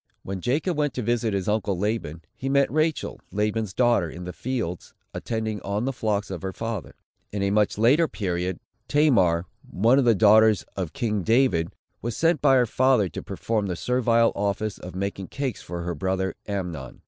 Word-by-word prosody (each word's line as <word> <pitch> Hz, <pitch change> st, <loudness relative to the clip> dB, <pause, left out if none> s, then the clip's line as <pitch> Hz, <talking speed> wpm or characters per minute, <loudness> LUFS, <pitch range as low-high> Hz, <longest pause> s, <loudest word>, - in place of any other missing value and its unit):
When 95 Hz, -1 st, -5 dB
Jacob 150 Hz, -, 0 dB
went 145 Hz, -1 st, 0 dB
to 125 Hz, -, -2 dB
visit 115 Hz, -2 st, 0 dB
his 95 Hz, -2 st, -2 dB
uncle 105 Hz, -3 st, 0 dB
Laban, 95 Hz, -6 st, -2 dB
he 135 Hz, -, -4 dB
met 140 Hz, 0 st, +3 dB
Rachel, 155 Hz, +2 st, -1 dB
Laban's 105 Hz, 0 st, -1 dB
daughter, 120 Hz, -5 st, +2 dB
in 90 Hz, +3 st, -8 dB
the 90 Hz, 0 st, -6 dB
fields, 115 Hz, -9 st, -4 dB, 0.2 s
attending 110 Hz, -3 st, -3 dB
on 100 Hz, +5 st, -2 dB
the 135 Hz, -, -1 dB
flocks 105 Hz, -4 st, -1 dB
of 90 Hz, -4 st, -5 dB
her 95 Hz, -, -3 dB
father. 115 Hz, -3 st, -5 dB, 0.4 s
In 100 Hz, -1 st, -2 dB
a 100 Hz, -, +1 dB
much 105 Hz, 0 st, +2 dB
later 135 Hz, +10 st, +4 dB
period, 90 Hz, -, -3 dB, 0.3 s
Tamar, 100 Hz, -, +3 dB, 0.2 s
one 115 Hz, +8 st, +3 dB
of 135 Hz, -, +2 dB
the 115 Hz, -2 st, +5 dB
daughters 110 Hz, 0 st, +5 dB
of 90 Hz, -5 st, -4 dB
king 105 Hz, -4 st, -1 dB
David, 110 Hz, -6 st, +2 dB, 0.3 s
was 120 Hz, -1 st, -4 dB
sent 165 Hz, 0 st, +2 dB
by 135 Hz, -2 st, +5 dB
her 125 Hz, -1 st, +4 dB
father 125 Hz, -4 st, +2 dB
to -, -, -6 dB
perform 110 Hz, -3 st, -2 dB
the 90 Hz, -, -2 dB
servile 115 Hz, +2 st, +2 dB
office 100 Hz, +1 st, -2 dB
of 90 Hz, 0 st, -9 dB
making 95 Hz, 0 st, -3 dB
cakes 135 Hz, -3 st, -4 dB
for 85 Hz, 0 st, -6 dB
her 85 Hz, 0 st, -2 dB
brother 95 Hz, +3 st, -1 dB
Amnon. 90 Hz, -10 st, -5 dB
105 Hz, 185 wpm, -25 LUFS, 95-120 Hz, 0.4 s, the